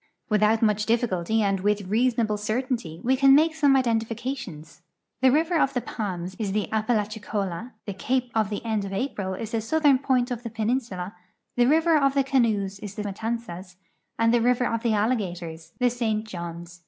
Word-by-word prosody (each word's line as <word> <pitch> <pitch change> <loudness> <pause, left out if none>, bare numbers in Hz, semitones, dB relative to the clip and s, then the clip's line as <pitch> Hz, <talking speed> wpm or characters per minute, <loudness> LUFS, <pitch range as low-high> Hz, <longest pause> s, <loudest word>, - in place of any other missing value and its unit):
Without 215 +1 +3
much 210 -1 +2
dillicult}'' 220 -3 +1
and 195 -1 +1
with 205 +2 +1
reason 235 +5 +1
able 215 -2 0
certainty 215 - -3
we 260 +2 +3
can 270 +1 +6
make 315 +2 +4
some 290 -3 +4
identifications. 230 - -2 0.4
The 260 - +6
River 320 +4 +2
of 270 - +1
the 245 - +1
Palms 185 -5 -5
is 200 -3 -2
the 210 -1 0
Apalachicola, 215 -1 -2
the 200 - -4
Cape 250 +5 -1
of 220 -3 +1
the 210 +2 -5
End 220 -3 0
of 195 - -5
A])ril 195 -4 -3
is 225 -1 -5
the 225 - -1
southern 285 +2 +3
[mint 250 -1 +2
of 240 -1 -3
the 235 - -6
j)cninsula, 220 -4 -2 0.4
the 245 0 +4
River 320 +3 +4
of 275 -1 +2
the 275 - +3
Canoes 215 -7 +1
is 205 -1 -8
the 210 - -4
Matanzas, 200 -3 -5 0.4
and 230 0 +3
the 240 - +3
River 245 +1 +2
of 230 -1 -1
the 230 -2 +1
Alligators 180 -7 -2
the 250 -1 +2
*St. 220 -3 -1
Johns. 170 -2 -7
220 Hz, 185 wpm, -25 LUFS, 200-250 Hz, 0.4 s, can